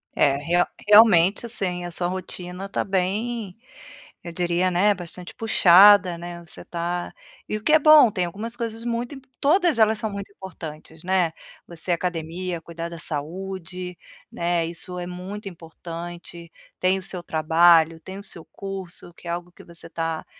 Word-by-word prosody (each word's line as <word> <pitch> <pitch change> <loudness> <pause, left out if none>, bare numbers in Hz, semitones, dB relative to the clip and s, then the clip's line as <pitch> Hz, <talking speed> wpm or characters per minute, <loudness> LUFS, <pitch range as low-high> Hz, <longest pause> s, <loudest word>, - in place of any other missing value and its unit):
É, 140 -1 +3
real 175 +4 +2 0.2
realmente, 205 -2 +6
assim, 180 -6 -1
a 175 - -6
sua 175 +1 -1
rotina 185 +1 -5
tá 200 - -2
bem, 200 +2 -2 0.7
eu 170 - -7
diria, 175 +1 0
né, 200 +4 +3
bastante 180 0 -9
puxada, 200 -3 +6
né. 175 0 -8
Você 160 - -10
tá 175 +1 -4 0.3
e 215 - -2
o 215 - -11
que 305 - +3
é 315 - +7
bom, 305 -5 +8
tem 185 -4 -1
algumas 215 +7 -6
coisas 230 -1 -5
muito 240 +3 -3
im 270 - -11 0.2
todas 325 -2 +3
elas 220 0 +4
são 215 +1 -3
muito 200 0 -7
importantes, 160 -4 -10
né. 180 -3 +1 0.3
Você, 170 +1 -5
academia, 175 0 -3
cuidar 170 0 -6
da 170 -1 -9
saúde, 180 +3 -5 0.3
né. 170 -1 0
Isso 175 +2 -7
é 175 - -4
muito 195 +3 -7
importante. 170 0 -9 0.3
Tem 185 +1 +2
o - - -11
seu 185 -2 -2
trabalho, 165 0 +4
tem 190 +3 -9
o 200 - -9
seu 170 -5 -7
curso, 190 -3 -8
que 170 - -14
é - - -2
algo 175 +1 -5
que - - -16
você 170 -1 -11
tá, 165 -1 -3
180 Hz, 170 wpm, -24 LUFS, 170-200 Hz, 0.7 s, bom